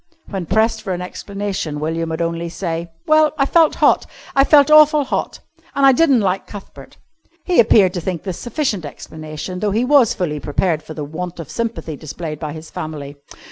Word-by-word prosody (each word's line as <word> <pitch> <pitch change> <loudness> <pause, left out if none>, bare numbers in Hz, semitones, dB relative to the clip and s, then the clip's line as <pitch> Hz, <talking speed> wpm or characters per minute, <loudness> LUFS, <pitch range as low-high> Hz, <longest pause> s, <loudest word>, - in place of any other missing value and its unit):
When 190 -4 -4
pressed 220 +3 +1
for 190 - -3
an 180 - -4
explanation 195 -5 -5
William 165 +2 -2
would 160 +1 -2
only 170 0 -3
say: 170 -1 -4 0.2
"Well, 310 0 +4
I 275 - +3
felt 325 +1 +3
hot. - - +3 0.3
I 275 - +6
felt 285 0 +5
awful 305 -1 +7
hot, 260 - -3 0.3
an' 275 - +3
I 270 - +8
di'n't 270 -3 +3
like 190 -1 -1
Cuthbert." 205 -2 -12 0.5
He 360 - +2
appeared 210 -5 +5
to 175 - -3
think 175 -2 -4
this 185 -4 -5
sufficient 240 - -2
explanation, 155 +4 -7
though 210 - 0
he 220 +5 +1
was 270 -4 +4
fully 150 -5 -2
prepared 155 +2 -1
for 155 - -10
the 150 - -4
want 175 +4 -6
of 165 - -8
sympathy 230 -9 -4
displayed 155 +1 -7
by 155 -2 -4
his 155 +1 -10
family. 145 -2 -6
185 Hz, 190 wpm, -19 LUFS, 160-240 Hz, 0.5 s, I